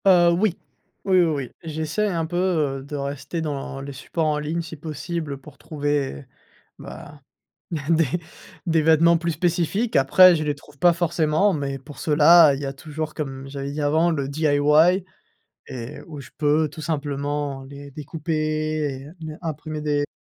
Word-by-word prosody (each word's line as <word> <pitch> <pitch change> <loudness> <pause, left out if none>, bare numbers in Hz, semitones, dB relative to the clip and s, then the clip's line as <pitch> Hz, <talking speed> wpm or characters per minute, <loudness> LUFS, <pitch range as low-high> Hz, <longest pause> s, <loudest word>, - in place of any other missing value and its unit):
Heu, 175 -3 +6
oui, 180 +1 +1 0.5
oui, 190 -2 +4
oui, - - +4
oui, 140 -6 -2
j'essaie 160 +6 -2
un 170 -5 -1
peu, 170 +2 -6
heu, 155 -7 0
de 140 +2 -7
rester 140 +3 -4
dans 140 -3 -4
les 140 0 -7
supports 160 +5 -3
en 150 -1 +1
ligne, 155 +3 -2
si 160 0 -8
possible 155 -1 -5
pour 140 +1 -15
trouver, 145 - -2 0.5
bah, 145 -1 -10 0.7
des 165 0 +4 0.6
des 165 -2 +2
vêtements 165 +2 +5
plus 170 0 -1
spécifiques. 175 +7 0
Après, 175 +7 +7
je 155 - -2
les 150 -1 0
trouve 145 0 -18
pas 175 +5 +5
forcément 170 +2 +1
mais, 140 -2 -3
pour 140 +2 -13
cela, 155 0 +6
il 135 - -5
y 145 - -3
a 135 - -3
toujours 155 +2 -6
comme 135 -3 -5
j'avais 140 0 -5
dit 150 - -4
avant, 160 +4 +3
le 140 -4 -1
DIY 155 +5 +3 0.6
et 125 +3 -7
où 150 -3 -8
je 125 - -11
peux 150 +1 +2
tout 155 +2 -10
simplement, 145 -2 -3
les 140 +1 -10
découper 155 +3 -5 0.7
et - - -11
heu, 150 - -11
ne 155 -1 -6
imprimer 155 -1 -5
des 145 -1 0
150 Hz, 170 wpm, -23 LUFS, 140-165 Hz, 0.7 s, Après